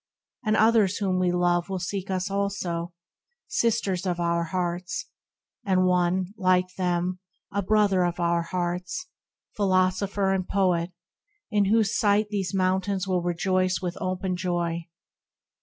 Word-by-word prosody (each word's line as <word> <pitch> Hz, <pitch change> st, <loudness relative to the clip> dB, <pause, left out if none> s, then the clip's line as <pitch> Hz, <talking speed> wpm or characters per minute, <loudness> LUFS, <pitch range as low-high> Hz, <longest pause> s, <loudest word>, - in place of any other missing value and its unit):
And 215 Hz, -1 st, +2 dB
others 220 Hz, -3 st, +4 dB
whom 190 Hz, -3 st, 0 dB
we 180 Hz, -1 st, +2 dB
love 175 Hz, 0 st, +1 dB
Will 190 Hz, -, -2 dB
seek 190 Hz, +2 st, -4 dB
us 185 Hz, 0 st, -1 dB
also, 190 Hz, -4 st, -2 dB, 0.6 s
Sisters 200 Hz, -5 st, 0 dB
of 175 Hz, -1 st, -1 dB
our 170 Hz, 0 st, +1 dB
hearts, 180 Hz, +3 st, -3 dB, 0.6 s
And 185 Hz, -2 st, +2 dB
one, 180 Hz, +1 st, +1 dB
like 185 Hz, -2 st, +2 dB
them, 180 Hz, 0 st, -1 dB, 0.3 s
a 200 Hz, 0 st, 0 dB
Brother 200 Hz, -2 st, +3 dB
of 175 Hz, 0 st, -1 dB
our 170 Hz, 0 st, +2 dB
hearts, 180 Hz, -, -3 dB, 0.5 s
Philosopher 190 Hz, 0 st, +1 dB
and 185 Hz, -1 st, -1 dB
Poet, 180 Hz, -3 st, +1 dB, 0.6 s
in 205 Hz, -2 st, +3 dB
whose 215 Hz, 0 st, +2 dB
sight 210 Hz, 0 st, +2 dB
These 195 Hz, -3 st, -2 dB
mountains 190 Hz, 0 st, 0 dB
will 185 Hz, -2 st, +1 dB
rejoice 185 Hz, +1 st, 0 dB
with 180 Hz, -1 st, -3 dB
open 185 Hz, 0 st, -1 dB
joy. 170 Hz, -2 st, -2 dB
185 Hz, 135 wpm, -26 LUFS, 175-195 Hz, 0.6 s, others